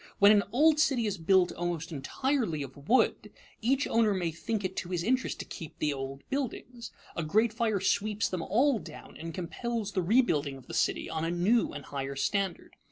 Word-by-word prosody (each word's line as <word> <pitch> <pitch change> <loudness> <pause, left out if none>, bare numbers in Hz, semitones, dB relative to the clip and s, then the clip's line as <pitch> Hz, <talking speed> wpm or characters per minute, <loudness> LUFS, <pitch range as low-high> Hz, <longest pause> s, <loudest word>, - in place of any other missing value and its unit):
When 200 +1 +7
an 210 -1 +6
old 300 +4 +4
city 270 -6 +3
is 200 -3 -2
built 180 +2 +4
almost 170 -1 -3
entirely 165 - -1
of 140 +1 -11
wood, 260 - +3 0.3
each 265 +5 +2
owner 220 -3 +2
may 175 -3 -1
think 205 +6 -3
it 185 0 -3
to 175 - -3
his 175 -2 -1
interest 255 +5 0
to - - -6
keep 160 - -9
the 150 -1 0
old 135 0 -6
buildings. 250 -3 -4 0.2
A - - -1
great 215 +8 +2
fire 220 -3 0
sweeps 210 +2 +1
them 185 -2 -3
all 245 - +2
down 155 -5 -11
and 165 +1 -6
compels 210 +6 -3
the 190 - 0
rebuilding 165 - +2
of 130 - -15
the - - -9
city - - 0
on 160 - -3
a 165 - 0
new 185 +7 +2
and 145 -1 -8
higher 140 -1 -4
standard. 190 +7 -2
190 Hz, 200 wpm, -30 LUFS, 160-230 Hz, 0.3 s, When